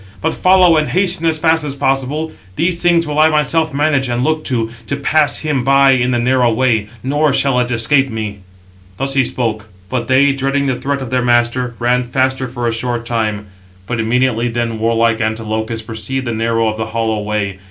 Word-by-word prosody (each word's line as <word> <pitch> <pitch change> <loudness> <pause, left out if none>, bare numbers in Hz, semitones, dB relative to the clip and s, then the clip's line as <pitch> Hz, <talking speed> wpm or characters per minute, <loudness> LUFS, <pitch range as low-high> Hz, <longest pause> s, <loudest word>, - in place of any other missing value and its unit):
But - - -1
follow, 185 -3 +4
and 155 -1 +1
hasten 175 +2 +2
as 160 -1 +2
fast 160 0 +2
as 140 -2 -4
possible. 140 +3 -1 0.2
These 170 +1 0
things 170 -1 +3
will 150 0 -2
I 155 +1 +6
myself 155 +1 +1
manage 140 -2 0
and 120 +1 -1
look 155 +2 0
to, 115 -3 -2 0.2
to 140 - -1
pass 145 +1 +1
him 150 -5 -1
by 135 +1 +4
in 125 -1 +2
the 125 - +1
narrow 125 0 +2
way; 110 -3 +1 0.2
nor 145 +3 +1
shall 135 -1 +2
it 125 -1 0
escape 135 +4 +2
me." 110 -3 -5 0.6
Thus 135 +4 -2
he 135 -1 +3
spoke; 110 -4 -2 0.2
but 125 -2 -2
they, 135 +2 +4
dreading 135 +1 -1
the 130 -2 -1
threat 140 0 -2
of 125 - -8
their 130 -1 +1
master, 120 0 +1
ran 125 +1 +1
faster 130 +1 -1
for 120 -1 -4
a 115 - 0
short 120 0 -3
time: 110 -3 -2 0.4
but 115 +3 -3
immediately 120 +1 +1
then 115 -1 -3
warlike 115 0 +1
Antilochus 110 0 -3
perceived 120 +4 -4
the 120 - -2
narrow 115 0 0
of 110 0 -2
the 110 - -3
hollow 110 -1 -2
way. 105 -2 -3
125 Hz, 200 wpm, -16 LUFS, 115-140 Hz, 0.6 s, I